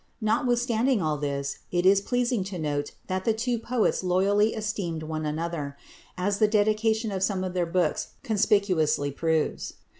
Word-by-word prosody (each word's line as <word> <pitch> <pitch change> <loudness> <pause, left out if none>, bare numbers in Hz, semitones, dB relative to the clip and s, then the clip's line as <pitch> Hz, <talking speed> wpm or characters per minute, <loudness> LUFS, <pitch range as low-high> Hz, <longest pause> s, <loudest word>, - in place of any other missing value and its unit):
Notwithstanding 240 +2 +1
all 155 -4 0
this, 140 -1 -3
it 175 0 +1
is 195 +1 +6
pleasing 245 -1 0
to 190 -1 -5
note 145 -2 -2
that 185 0 -2
the 225 - +2
two 235 +1 -1
poets 230 -4 0
loyally 200 +4 +2
esteemed 200 -7 -3
one 155 0 -3
another, 150 -2 -3 0.4
as 195 +2 0
the 215 - +5
dedication 215 +1 +1
of 190 -1 -3
some 190 -1 0
of 185 -1 -3
their 175 -2 0
books 170 -2 0 0.2
conspicuously 195 -9 +2
proves. 160 +2 -1
190 Hz, 155 wpm, -26 LUFS, 160-220 Hz, 0.4 s, is